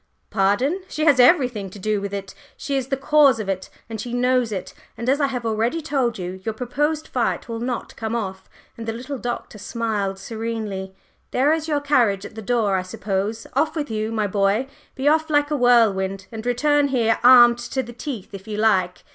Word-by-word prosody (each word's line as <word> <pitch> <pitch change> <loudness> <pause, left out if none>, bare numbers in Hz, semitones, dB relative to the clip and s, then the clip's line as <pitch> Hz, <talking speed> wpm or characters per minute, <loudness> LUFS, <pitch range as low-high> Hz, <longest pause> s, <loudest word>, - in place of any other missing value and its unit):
"Pardon! 225 - +1
She 310 -3 -2
has 285 -5 +5
everything 245 - +4
to 190 - -12
do 210 +1 -1
with 200 0 -4
it. 195 -1 -5 0.2
She 280 - -3
is 265 -2 -1
the 270 0 -1
cause 275 -3 +4
of 215 - -4
it 190 -1 -3 0.2
and 220 -2 -5
she 240 +2 -4
knows 250 -1 +2
it. 190 -3 -5 0.2
And 235 - -5
as 275 +3 +2
I 280 - +3
have 250 -3 -4
already 225 +7 0
told 275 -7 -1
you, 185 0 -6
your 220 +1 -3
proposed 295 +6 -1
fight 245 -2 -1
will 230 -1 -4
not 245 0 -4
come 225 +1 -3
off." 190 -4 -5 0.3
And 230 -1 -7
the 225 - -1
little 255 +4 -6
Doctor 240 -3 -5
smiled 205 -3 -2
serenely. 215 -3 -5 0.3
"There 280 +4 +3
is 320 0 -2
your 295 -2 0
carriage 235 -9 +2
at - - -9
the 220 - -7
door, 215 -3 +1
I - - 0
suppose. 200 +4 -3
Off 310 +4 +1
with 295 -6 -3
you, 215 0 -2
my 220 -2 0
boy! 200 +4 +1 0.3
be 265 +2 -1
off 315 +1 +3
like 290 0 +2
a - - +2
whirlwind, 200 -7 +3
and 225 +1 -6
return 290 +4 +2
here 235 -4 +1
armed 240 -1 +8
to 265 +1 -3
the 240 0 -10
teeth 240 -5 -6
if 195 +1 -9
you 210 -1 -4
like! 190 -5 +1
230 Hz, 210 wpm, -22 LUFS, 205-270 Hz, 0.3 s, armed